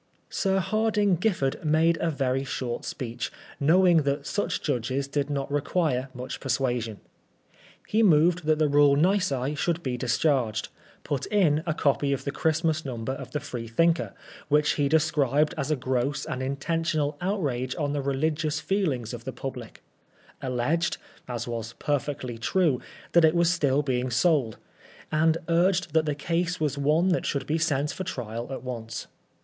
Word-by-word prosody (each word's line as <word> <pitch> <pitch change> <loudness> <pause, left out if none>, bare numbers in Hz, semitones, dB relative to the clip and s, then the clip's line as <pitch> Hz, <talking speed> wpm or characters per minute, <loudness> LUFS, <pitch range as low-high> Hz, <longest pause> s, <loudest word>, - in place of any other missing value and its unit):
Sir 195 -1 +1
Hardinge 205 -1 +1
Giffard 175 -11 0
made 160 +2 +3
a 170 - +1
very 135 -3 0
short 125 -3 -4
speech, 120 -3 -4 0.3
knowing 175 +4 +5
that 140 -1 0
such 205 - -2
judges 135 0 -1
did 140 0 -1
not 140 -1 -2
require 145 -3 0
much 125 +1 -6
per 135 - -7
suasion. 120 -4 0 0.9
He 220 - +2
moved 170 -3 +4
that 155 -1 +4
the 155 -1 +3
rule 145 -1 +5
nisi 150 -5 +1
should 170 +2 -1
be 125 -2 -2
dis 120 -1 0
charged; 130 -8 +1 0.3
put 140 -3 -2
in 170 -8 +3
a 155 - 0
copy 140 -1 +1
of 135 - -3
the 140 - -2
Christmas 160 +1 0
Number 120 -2 -4
of 135 -1 -6
the 150 - -2
Freethinker^ 145 +4 0 0.3
which 150 0 +3
he 145 -2 +1
described 150 -1 +2
as 150 -3 -3
a 155 - +2
gross 130 +1 -1
and 130 - -4
intentional 150 +2 -1
outrage 140 -10 -1
on 145 -2 -1
the 145 - -1
religious 150 +3 0
feelings 150 - -1
of 120 -1 -7
the 130 - -4
public; 125 -2 -7 0.6
alleged, 135 +7 0 0.3
as 120 -1 -4
was 115 -1 -4
perfectly 140 -4 -3
true, 150 +1 +1 0.3
that 170 - +5
it 160 +1 +5
was 170 0 +4
still 145 -4 +2
being 130 -2 -1
sold; 130 -4 +2 0.5
and 160 +1 +3
urged 175 0 +2
that 160 -1 +3
the 150 - 0
case 170 +4 -1
was 150 -3 0
one 150 +6 +2
that 175 - +1
should 140 - -1
be 160 +2 0
sent 145 -3 +1
for 190 - -5
trial 120 -8 -5
at 135 - -5
once. 115 -3 -5
145 Hz, 165 wpm, -26 LUFS, 130-165 Hz, 0.9 s, knowing